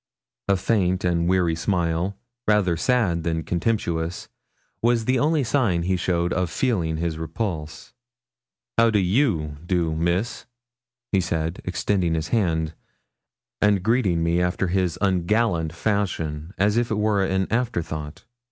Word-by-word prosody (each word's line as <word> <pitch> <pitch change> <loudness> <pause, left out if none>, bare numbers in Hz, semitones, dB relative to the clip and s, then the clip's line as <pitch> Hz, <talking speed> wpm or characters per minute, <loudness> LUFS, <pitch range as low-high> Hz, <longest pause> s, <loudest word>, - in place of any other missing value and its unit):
A 100 -1 +3
faint 95 -2 +1
and 85 -1 +1
weary 90 -3 +2
smile, 85 +2 -1 0.3
rather 105 -5 +3
sad 90 -2 +1
than 80 0 -1
comtemptuous, 85 -3 -2 0.5
was 115 -1 +2
the 130 +1 +2
only 150 +1 +2
sign 110 -9 +1
he 95 +2 +1
showed 90 -1 0
of 90 -1 0
feeling 85 -8 0
his 80 -1 -2
repulse. 80 -2 -4 0.9
'How 115 0 +6
do 110 - +2
you 90 - +1
do, 85 -2 0
Miss?' 85 +8 -1 0.6
he 95 - +3
said, 80 0 -2
extending 90 -2 0
his 80 0 -3
hand, 80 -8 +1 0.9
and 100 -3 +3
greeting 100 -7 +2
me 85 +1 +2
after 90 +1 0
his 90 -2 0
ungallant 95 -2 +1
fashion, 85 -4 -2
as 105 +3 +2
if 120 0 +1
it 110 - -1
were 105 -2 +2
an 95 0 +1
afterthought. 85 -11 -2
90 Hz, 135 wpm, -24 LUFS, 85-105 Hz, 0.9 s, How